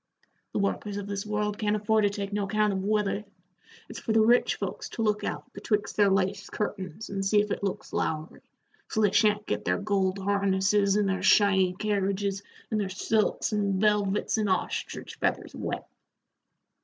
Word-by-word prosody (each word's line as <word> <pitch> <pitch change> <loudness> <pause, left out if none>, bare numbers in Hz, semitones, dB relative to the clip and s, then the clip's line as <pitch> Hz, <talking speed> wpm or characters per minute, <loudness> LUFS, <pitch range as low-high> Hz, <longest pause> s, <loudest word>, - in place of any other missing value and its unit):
"The - - -1
workers 200 0 -1
of 205 - -4
this 200 0 -4
world 210 0 -1
can't 210 -1 +1
afford 215 0 +2
to - - +4
take 200 0 -5
no 205 -1 0
account 210 +1 +1
of 190 0 -2
weather. 210 0 0 0.6
It's - - -8
for 220 - -2
the 220 -1 +5
rich 240 +2 +4
folks - - -5
to 225 - -3
look 210 -1 +1
out - - -5
betwixt 210 -2 -1
their 205 -1 +4
lace 195 +1 0
curtains 205 -1 -4
and 195 0 -2
see 205 +2 +3
if 210 0 0
it - - -3
looks 195 - -3
lowery, 155 +1 -2 0.5
so 220 - -1
they 205 -2 +4
sha'n't 210 0 +3
git - - -2
their - - +1
gold 200 -2 0
harnesses 200 0 +2
and 210 -1 +2
their 190 -1 -1
shiny 190 -3 +4
carriages, 200 -1 -1 0.3
an' 215 - +1
their 200 -2 -1
silks 215 +3 0
an' 200 -2 +1
velvets 210 0 +1
an' 210 - +1
ostrich 185 - -2
feathers - - -1
wet. - - -4
205 Hz, 180 wpm, -28 LUFS, 195-210 Hz, 0.6 s, the